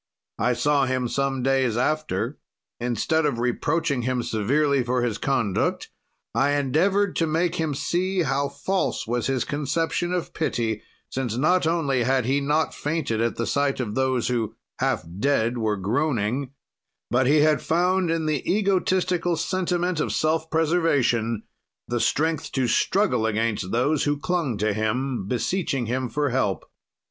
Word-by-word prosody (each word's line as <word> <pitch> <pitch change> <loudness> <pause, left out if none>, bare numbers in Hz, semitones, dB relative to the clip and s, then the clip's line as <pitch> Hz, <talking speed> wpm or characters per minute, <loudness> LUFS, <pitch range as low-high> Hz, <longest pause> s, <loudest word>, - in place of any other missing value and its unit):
"I 125 - +2
saw 140 +3 +2
him 130 -1 0
some 135 0 -1
days 130 -3 +2
after; 130 -3 -1 0.4
instead 125 +7 0
of 135 -5 -1
reproaching 135 +4 0
him 125 0 -1
severely 135 +6 +1
for 125 0 0
his 115 -3 -1
conduct, 115 -8 0 0.4
I 140 +2 +2
endeavored 180 +8 +1
to 165 - +2
make 170 +3 0
him 160 -3 -1
see 180 +6 0
how 140 0 0
false 185 +7 -1
was 120 +1 -1
his 135 -2 0
conception 160 +4 -1
of 180 -2 -2
pity, 115 -9 -1 0.3
since, 125 -4 -2
not 160 +5 +3
only 145 -6 +1
had 130 0 +1
he 135 +3 +1
not 150 +3 +1
fainted 145 -7 -2
at 115 0 0
the 115 - -2
sight 140 +1 0
of 110 -5 -2
those 130 -1 +1
who, 115 -4 -1 0.2
half - - 0
dead, 120 -2 +1
were 110 -2 0
groaning, 120 - 0 0.6
but 125 +1 +3
he 150 +2 +5
had 150 -2 +3
found 180 +2 +1
in 165 -1 0
the 155 -4 0
egotistical 185 -3 +1
sentiment 180 -1 -1
of - - 0
self 160 +1 0
preservation 140 -9 +1 0.4
the 120 0 -1
strength 160 +5 0
to 130 -2 +1
struggle 125 - +2
against 110 -3 -1
those 135 +6 +1
who 145 0 +1
clung 155 - -1
to 105 0 0
him, 110 +1 -1
beseeching 135 - -1
him 125 +2 -2
for 145 +3 0
help. 110 -7 0
135 Hz, 155 wpm, -24 LUFS, 120-160 Hz, 0.6 s, he